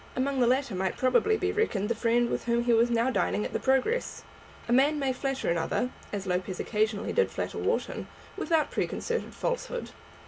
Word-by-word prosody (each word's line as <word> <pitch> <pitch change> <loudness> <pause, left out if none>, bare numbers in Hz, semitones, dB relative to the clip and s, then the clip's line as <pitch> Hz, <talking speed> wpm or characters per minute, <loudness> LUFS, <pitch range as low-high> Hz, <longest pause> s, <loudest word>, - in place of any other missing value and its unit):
Among 270 +1 0
the 245 - +4
latter 260 -2 +1
might 190 0 -1
probably 260 - +3
be 390 -1 0
reckoned 410 - 0
the 235 - +1
friend 235 +1 +1
with - - -2
whom 235 0 +1
he 240 0 +3
was 230 +1 +4
now 235 +2 +2
dining 210 - 0
at - - -5
the - - 0
Progress. 270 - 0 0.4
A 235 - +1
man 285 +4 +4
may 270 -2 0
flatter 270 +1 -2
another, 170 +9 0 0.2
as 200 -2 -4
Lopez 180 0 -2
occasionally 215 -1 0
did 475 - +3
flatter - - -4
Wharton, - - -1 0.3
without 315 -4 +1
preconcerted 475 0 -2
falsehood. - - -3
250 Hz, 185 wpm, -28 LUFS, 225-285 Hz, 0.4 s, the